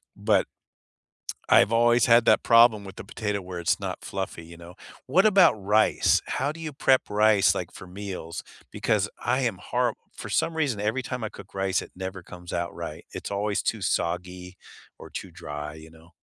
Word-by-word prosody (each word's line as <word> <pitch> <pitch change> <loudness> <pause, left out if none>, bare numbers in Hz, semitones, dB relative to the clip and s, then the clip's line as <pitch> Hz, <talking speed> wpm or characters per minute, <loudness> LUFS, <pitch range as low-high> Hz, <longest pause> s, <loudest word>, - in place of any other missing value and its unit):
But - - +2 1.0
I've 100 +4 +5
always 120 0 +4
had 115 0 +5
that - - +5
problem 115 -3 +5
with 95 0 -10
the - - -8
potato, 105 -2 -3
where 90 -1 -7
it's 85 - 0
not - - -5
fluffy, 95 -4 -5
you 85 +1 -12
know? 85 +1 -12 0.3
What 185 +10 +4
about 195 - +6
rice? 105 +1 +2
How 140 +2 -1
do 165 - -12
you 155 -2 -5
prep 135 -1 +3
rice, 105 -1 +4
like, - - -5
for 95 - -11
meals? 90 -3 -7 0.3
Because - - 0
I 125 +3 0
am 115 -8 -1
horri - - +1 0.2
for - - -7
some 165 - 0
reason, 140 -10 0
every 110 +5 -1
time 125 -2 -5
I - - -2
cook 95 - -13
rice, 95 -1 0
it - - -11
never 95 0 -6
comes 90 0 -11
out 85 0 -3
right. - - -7
It's - - -6
always 100 +1 -1
too 110 - -1
soggy 90 +1 -3 0.4
or - - -11
too 95 - -7
dry, 75 -3 -7
you 80 0 -13
know? 80 +1 -19
100 Hz, 190 wpm, -26 LUFS, 90-115 Hz, 1.0 s, about